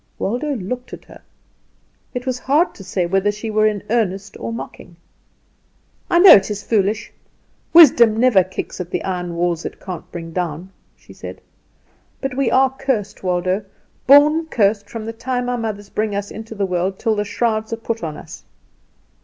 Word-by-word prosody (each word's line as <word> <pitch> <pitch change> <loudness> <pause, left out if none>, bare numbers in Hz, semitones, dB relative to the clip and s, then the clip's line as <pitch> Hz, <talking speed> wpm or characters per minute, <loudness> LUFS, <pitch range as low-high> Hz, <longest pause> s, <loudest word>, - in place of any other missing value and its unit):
Waldo 275 +8 -2
looked 250 +4 -6
at - - -10
her. - - -15 0.9
It 250 +1 -4
was 255 -1 -2
hard 300 +8 +2
to 195 - -12
say 185 -1 -1
whether 195 +3 +1
she 215 +2 -6
were 215 0 +3
in 210 -2 -2
earnest 200 -3 -1
or - - -4
mocking. 205 -6 -8 1.1
"I 345 - +3
know 365 +1 +9
it 195 0 +5
is 205 -1 -4
foolish. 210 0 0 0.6
Wisdom 240 -10 +7
never 230 -6 +5
kicks 185 0 -6
at 175 - -7
the - - -3
iron 180 -2 -3
walls 170 -1 -1
it - - -7
can't 180 -3 -8
bring 165 -1 -7
down," 175 +1 -4 0.2
she - - -17
said. - - -9 0.8
"But 270 -2 -4
we 275 -2 +1
are 265 0 +3
cursed. 250 -7 -3
Waldo, 185 +2 -1 0.4
born 300 +4 +6
cursed 205 -6 +1
from 225 -2 -6
the 225 - -5
time 245 +1 -3
our 245 0 -1
mothers 205 -3 -5
bring 215 -1 -1
us 200 0 -4
into 220 0 -8
the 200 -1 -1
world 185 +1 -1
till 225 - 0
the 210 - 0
shrouds 220 +1 -1
are 230 - -2
put 230 0 -4
on 155 -2 -4
us. - - -11
215 Hz, 180 wpm, -19 LUFS, 190-245 Hz, 1.1 s, know